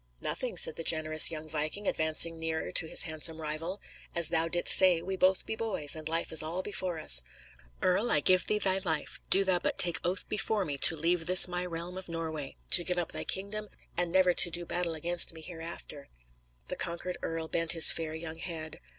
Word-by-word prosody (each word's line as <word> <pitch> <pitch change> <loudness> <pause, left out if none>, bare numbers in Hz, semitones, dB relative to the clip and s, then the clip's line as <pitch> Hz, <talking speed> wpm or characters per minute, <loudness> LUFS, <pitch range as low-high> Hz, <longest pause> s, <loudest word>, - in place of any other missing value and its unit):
"Nothing," - - -5
said - - +4
the 165 - -5
generous 155 -1 +3
young 155 -1 -8
viking, 155 +7 -4
advancing 160 +1 +1
nearer 160 0 -4
to 160 - +2
his - - +3
handsome 160 -1 -2
rival. 160 +5 -5 0.4
"As 170 -2 +5
thou 165 0 +1
didst 175 +1 +1
say, 185 -3 +3
we 190 +3 -6
both 185 0 +1
be 220 - -5
boys, 205 -11 -2
and 155 0 -4
life 165 +1 -1
is 160 - +3
all 165 +4 -5
before 185 -4 -4
us. 65 -3 +7 0.6
Earl, 195 +6 0
I - - +4
give 185 +5 +2
thee 210 - 0
thy 190 -2 0
life, 160 -6 -4
do 195 - +4
thou 185 -2 +1
but - - -3
take 175 -2 +1
oath 180 +2 -3
before 210 -1 -1
me 145 -2 -5
to 160 - +8
leave 165 +1 -1
this 185 +1 +9
my 180 0 -3
realm 175 +2 -6
of 185 - -13
Norway, 160 -4 -6 0.2
to 175 - +8
give 180 +1 -3
up 175 - -2
thy - - -5
kingdom, 210 +2 -4 0.3
and 175 -1 0
never 185 0 +3
to 175 - +4
do 175 +1 -5
battle 175 -1 -1
against 170 +1 -1
me 160 - -10
hereafter." 165 -4 -10 0.6
The - - -5
conquered 180 0 -6
earl 165 0 -5
bent 165 0 -1
his 165 -2 +7
fair 160 -1 -5
young 160 0 -8
head. 160 -3 -6
170 Hz, 210 wpm, -29 LUFS, 160-185 Hz, 0.6 s, this